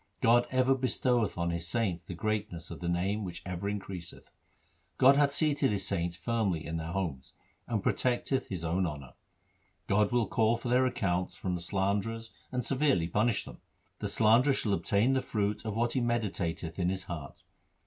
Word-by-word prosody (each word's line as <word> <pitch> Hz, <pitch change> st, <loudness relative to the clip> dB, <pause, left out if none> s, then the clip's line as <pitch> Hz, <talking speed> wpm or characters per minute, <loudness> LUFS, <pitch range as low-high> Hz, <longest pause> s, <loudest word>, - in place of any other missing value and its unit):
God 120 Hz, +1 st, +4 dB
ever 130 Hz, 0 st, +3 dB
bestoweth 125 Hz, -5 st, +1 dB
on 85 Hz, 0 st, 0 dB
His 85 Hz, 0 st, -3 dB
saints 90 Hz, -3 st, -1 dB
the 90 Hz, -, -7 dB
greatness 105 Hz, -3 st, -3 dB
of -, -, -7 dB
the 85 Hz, -, -3 dB
Name 95 Hz, +5 st, 0 dB
which 90 Hz, -3 st, -6 dB
ever 90 Hz, +2 st, -3 dB
increaseth. 95 Hz, -4 st, -6 dB, 0.7 s
God 135 Hz, +2 st, +7 dB
hath 145 Hz, 0 st, +4 dB
seated 145 Hz, -2 st, +2 dB
His 100 Hz, -3 st, -1 dB
saints 85 Hz, -3 st, -1 dB
firmly 100 Hz, -5 st, -1 dB
in 80 Hz, +2 st, -3 dB
their 80 Hz, 0 st, -4 dB
homes 85 Hz, -9 st, -3 dB, 0.3 s
1 120 Hz, -, -2 dB
and 105 Hz, -, -1 dB
protecteth 130 Hz, +1 st, 0 dB
His 90 Hz, -4 st, -4 dB
own 90 Hz, +3 st, +1 dB
honour. 70 Hz, -5 st, -7 dB, 0.7 s
God 105 Hz, +1 st, +2 dB
will 120 Hz, -2 st, +2 dB
call 110 Hz, +3 st, +2 dB
for 120 Hz, +1 st, -5 dB
their 130 Hz, +1 st, +4 dB
accounts 90 Hz, -7 st, -1 dB
from 90 Hz, -, -3 dB
the 90 Hz, -, -2 dB
slanderers 100 Hz, +5 st, -1 dB, 0.2 s
and 125 Hz, -1 st, -2 dB
severely 130 Hz, -, +2 dB
punish 105 Hz, +5 st, +1 dB
them. -, -, -11 dB, 0.4 s
The -, -, -2 dB
slanderer 115 Hz, +6 st, +4 dB
shall 105 Hz, -, 0 dB
obtain 105 Hz, +6 st, +2 dB
the 130 Hz, -, +2 dB
fruit 105 Hz, -1 st, -2 dB
of 110 Hz, -2 st, -3 dB
what 115 Hz, +1 st, +1 dB
he 130 Hz, -, +1 dB
meditateth 100 Hz, -8 st, -2 dB
in 90 Hz, -1 st, +2 dB
his 95 Hz, -1 st, -2 dB
heart. 80 Hz, -6 st, -8 dB
100 Hz, 185 wpm, -30 LUFS, 90-120 Hz, 0.7 s, God